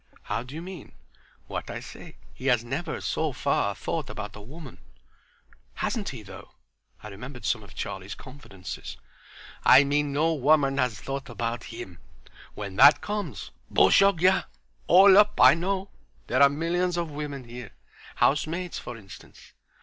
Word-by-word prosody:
"How - - -3
do 125 +4 -10
you 165 - -6
mean?" 180 -4 -10 0.5
"What - - -6
I - - -5
say. - - -12 0.2
He 130 - -6
has 120 -3 +3
never, 150 +7 -4
so 160 -1 -1
far, 120 -6 0
thought 155 -5 -4
about 105 -1 -7
a 105 - -10
woman." 150 +10 -11 1.0
"Hasn't 225 -5 -2
he 125 -6 -8
though!" - - -13 0.5
I 105 - -8
remembered 125 +6 -9
some 115 - 0
of 100 -4 -15
Charlie's 95 +1 -6
confidences. 130 -9 -9 0.7
"I 135 - +8
mean 145 +1 0
no 155 +4 +1
woman 140 -1 +2
has 125 -5 0
thought 135 +3 -5
about 120 +1 -4
him. 115 -7 -9 0.6
When 100 -2 -7
that 140 +5 +8
comes; 205 - -5 0.2
bushogya—all 190 +1 +4
up' 210 0 +3
I - - +8
know. 190 +3 -2 0.3
There 130 +3 +1
are 140 - +8
millions 175 +4 -1
of 170 -2 -2
women 145 -2 -6
here. 120 -2 -9 0.5
Housemaids, 165 +5 0
for 120 -1 -8
instance." 100 -3 -15
140 Hz, 150 wpm, -26 LUFS, 120-165 Hz, 1.0 s, I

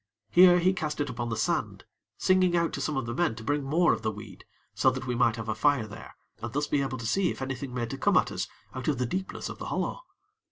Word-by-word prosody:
Here 180 0 +8
he 180 +2 +3
cast 155 -5 -3
it 145 -3 -1
upon 120 0 -4
the 115 - -2
sand, 110 - -1 0.3
singing 185 -2 +3
out 170 -1 +1
to - - -3
some 150 -3 -1
of 125 - -1
the 115 - -4
men 170 -3 +1
to 110 - -9
bring 145 +4 0
more 160 +6 +3
of 110 - -3
the 110 - 0
weed, 105 0 -10 0.3
so - - +4
that 130 0 -4
we 125 - -1
might 120 -2 +3
have 115 -1 -6
a 110 - 0
fire 135 +1 +2
there, 105 0 -11 0.3
and 120 0 -4
thus 145 +3 0
be 145 -1 +1
able 135 -1 -2
to 115 - -7
see 180 - +2
if - - -5
anything 135 0 -4
made 120 -2 -3
to 135 - -5
come - - +3
at - - +2
us - - -3 0.3
out 130 - -5
of 150 -4 +1
the 125 - 0
deepness 190 +10 -4
of - - -8
the - - -5
hollow. - - -2
135 Hz, 275 wpm, -28 LUFS, 115-160 Hz, 0.3 s, Here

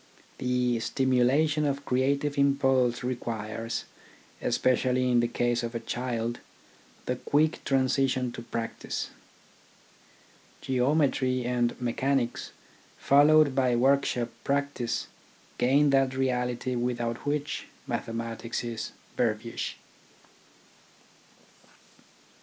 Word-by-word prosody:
The 125 -1 +1
stimula 130 +5 +2
tion 150 0 0
of 140 -1 -1
creative 140 +3 +1
impulse 135 -4 +2
requires, 115 -2 -3 0.6
especially 125 0 +2
in 120 - +4
the 120 - +2
case 120 0 0
of 120 0 -5
a - - -1
child, 120 0 -3 0.7
the 125 - -1
quick 155 +4 +1
transition 130 -1 +1
to 120 - -7
practice. 115 -1 -4 1.5
Geometry 130 -1 +1
and 120 -1 0
mechanics, 125 +1 -1 0.5
followed 145 0 +5
by 130 -2 +2
workshop 125 -1 +2
practice, 140 -4 -1 0.5
gain 140 +3 +4
that 135 -1 +3
reality 125 -1 -1
without 120 -1 -1
which 145 0 -2 0.2
mathe - - -2
matics 115 +1 -4
is 115 -1 -5 0.2
verbiage. 115 0 -2
125 Hz, 95 wpm, -28 LUFS, 120-135 Hz, 1.5 s, followed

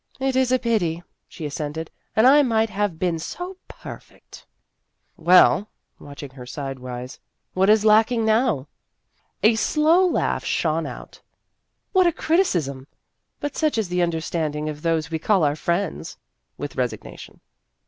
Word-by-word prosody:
" - - -25
It 260 - -2
is 260 -1 +2
a 255 - +4
pity," 180 -9 -1 0.2
she 160 - -8
assented; 150 +2 -5
" - - -46
and 220 - +4
I 285 +3 +7
might 225 -4 +1
have 205 -4 -1
been 175 -1 -1
so 360 - -6
perfect! - - -12 0.3
" - - -49
"Well," 185 +2 +6 0.3
watching 140 -1 -10
her 125 -2 -11
sidewise, 130 -2 -6 0.3
"what 190 +2 +2
is 215 0 +4
lacking 220 +2 +4
now? 220 - +1 0.3
" - - -45
A 220 +2 +6
slow 310 +10 +3
laugh - - 0
shone 160 -1 0
out: - - -10 0.3
" - - -53
What 370 -2 +5
a - - +4
criti 325 +2 +1 0.2
cism! 140 -4 -5 0.5
But 290 - -4
such 310 -6 0
is 215 -5 -1
the 180 0 0
understanding 160 -2 -2
of 150 0 -7
those 160 -1 -1
we 160 - -2
call 190 +1 +2
our 145 -1 +2
friends," 170 +3 -3 0.4
with - - -6
resignation. - - -5
180 Hz, 160 wpm, -23 LUFS, 155-225 Hz, 0.5 s, I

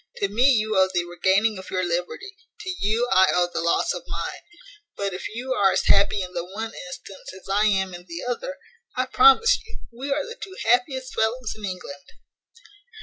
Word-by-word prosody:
To 200 - 0
me 240 +7 +4
you 215 -2 +1
owe 190 0 +4
the 175 -1 0
regaining 190 +4 +1
your 185 0 -1
liberty; 180 - -3 0.3
to 375 - -4
you 220 +4 +1
I 190 0 +6
owe 180 0 +3
the - - -1
loss 170 - +1
of - - -5
mine. - - -5 0.6
But 200 -1 -2
if 180 - -5
you 255 +2 -2
are 200 -5 +3
as - - 0
happy 200 0 +4
in 180 0 -8
the 170 - -2
one 220 +5 -6 0.2
instance 190 +1 -10
as - - -18
I 205 +2 +3
am 190 -2 +1
in 175 +1 -10
the 170 +1 -6
other, - - -3 0.4
I 255 - +1
promise 270 - +5
you 455 +1 -12
we 260 +4 -6
are 285 +1 0
the 470 +1 -9
two 380 -2 -8
happiest 255 +3 +1
fellows 225 +2 -1
in 215 -1 -7
England." 185 0 -8
210 Hz, 200 wpm, -24 LUFS, 185-255 Hz, 0.6 s, I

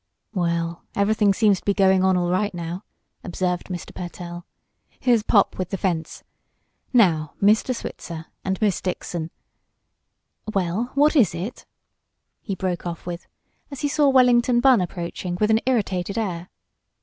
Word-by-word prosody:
"Well, 170 -2 -1
everything 205 0 +3
seems 200 -1 +3
to - - -27
be 200 - +1
going 190 -1 +4
on 190 -1 +3
all 175 0 0
right 190 +1 0
now," 170 +3 -5 0.4
observed 180 -1 -2
Mr. 180 -2 -6
Pertell. 175 0 -7 0.5
"Here's 240 -3 +3
Pop 205 -2 +2
with 185 -1 -2
the 195 - -3
fence. 170 -4 -2 0.7
Now, 165 - +3
Mr. 215 +5 +3
Switzer, 165 -7 -7 0.2
and 190 -1 -2
Miss 205 -3 +1
Dixon 175 -3 -4 1.3
well, 190 +4 0
what 295 +3 +4
is 220 - +4
it?" 185 +8 -6 0.7
he 195 - -4
broke 180 -1 -3
off 170 -1 -6
with, 175 0 -6 0.4
as 280 -3 -8
he 290 - +1
saw 290 0 +3
Wellington 250 -2 +4
Bunn 250 -4 +5
approaching 175 0 -4
with 215 +1 +3
an 220 - +4
irritated 200 -6 0
air. 180 -5 -3
190 Hz, 150 wpm, -23 LUFS, 175-220 Hz, 1.3 s, Bunn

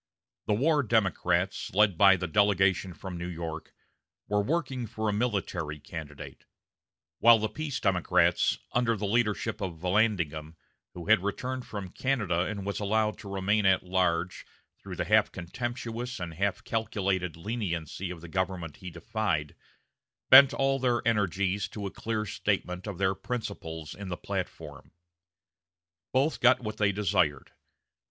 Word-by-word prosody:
The 105 - +2
war 150 +6 +3
Democrats, 95 -6 0
led 105 -2 +4
by 95 +2 +7
the 90 -1 -3
delegation 95 0 +2
from 95 -1 -7
New 85 - -4
York, 80 -2 -6 0.6
were 105 0 +1
working 130 -2 -2
for 110 +1 -3
a 105 - +1
military 95 -9 -2
candidate; 75 -2 -9 0.7
while 115 0 +8
the 110 0 -1
peace 145 +5 -4
Democrats, 90 -3 +2
under 120 -2 +2
the 105 - -3
leadership 110 0 0
of 90 -4 -4
Vallandigham, 90 -5 0 0.4
who 85 -1 -7
had 110 -2 +5
returned 125 +6 -3
from 100 -3 -6
Canada 105 -11 0
and 100 -2 -5
was 100 - -3
allowed 110 +1 0
to 100 - -9
remain 100 +1 +1
at 95 -1 +3
large 90 -1 0 0.4
through - - -7
the - - -2
half - - +3
contemptuous 120 +5 -5
and 85 -2 -5
half 100 +4 -1
calculated 95 -6 -1
leniency 90 -3 -3
of 90 -2 -7
the 85 - -9
government 90 -3 -3
he 90 - -8
defied, 85 -3 -2 0.8
bent 135 +1 +10
all 135 0 +1
their 120 -3 +1
energies 100 -2 +1
to 105 -2 -7
a 100 - -4
clear 110 -1 -3
statement 90 -1 -2
of 100 -4 -5
their 95 0 +2
principles 80 - -5
in 100 0 -8
the 90 -1 -4
platform. - - -6 1.2
Both 140 +4 +1
got 125 +1 +6
what 110 -3 -5
they 105 -1 +3
desired. 95 -9 0
100 Hz, 145 wpm, -28 LUFS, 90-110 Hz, 1.2 s, bent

